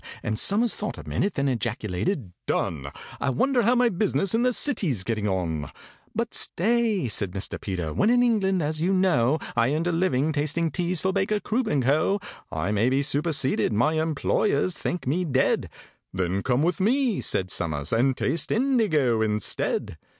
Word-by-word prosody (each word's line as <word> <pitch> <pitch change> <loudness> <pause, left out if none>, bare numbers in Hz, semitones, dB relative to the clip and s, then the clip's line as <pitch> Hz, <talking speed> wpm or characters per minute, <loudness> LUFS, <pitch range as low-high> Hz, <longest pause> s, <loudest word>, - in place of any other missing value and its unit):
And 110 0 -1
SOMERS 220 +3 +3
thought 210 - -4
a - - -10
minute, 200 0 -1
then 140 0 0
ejaculated, 120 - -2 0.2
"Done! 70 -5 -1 0.3
I - - 0
wonder 250 - +2
how 235 +3 +3
my 245 0 +4
business 195 0 0
in 225 - +2
the 250 +1 +3
City's 185 - 0
getting 105 0 -1
on?" 85 -6 -2 0.5
"But - - -2
stay," 220 - +1
said 100 -4 -1
Mr. 95 - -2
PETER: 90 -6 -3
"when 210 - +2
in 245 +1 +4
England, 195 -7 +1
as 155 +1 -2
you 185 +3 +2
know, 160 -8 +2 0.2
I 130 +6 +2
earned 160 +2 -1
a 175 - +1
living 160 -4 +1
tasting 155 +2 -1
teas 175 -1 0
for 190 0 0
BAKER, 200 +2 0
CROOP, 230 +2 -1
AND 145 -7 +1
CO., 155 +10 +2 0.3
I 80 +6 -2
may 105 +4 +2
be 135 +2 +1
superseded—my 140 -3 +1
employers 160 +1 0
think 175 -6 -4
me 160 +8 0
dead!" 135 -6 +1 0.4
"Then 95 +1 -1
come 125 +5 +1
with 175 +4 0
me," 240 +2 +1
said 95 -1 0
SOMERS, 75 -2 -2
"and 125 +3 +2
taste 165 - -1
indigo 200 - +2
instead." 105 -1 0
155 Hz, 170 wpm, -25 LUFS, -, 0.5 s, my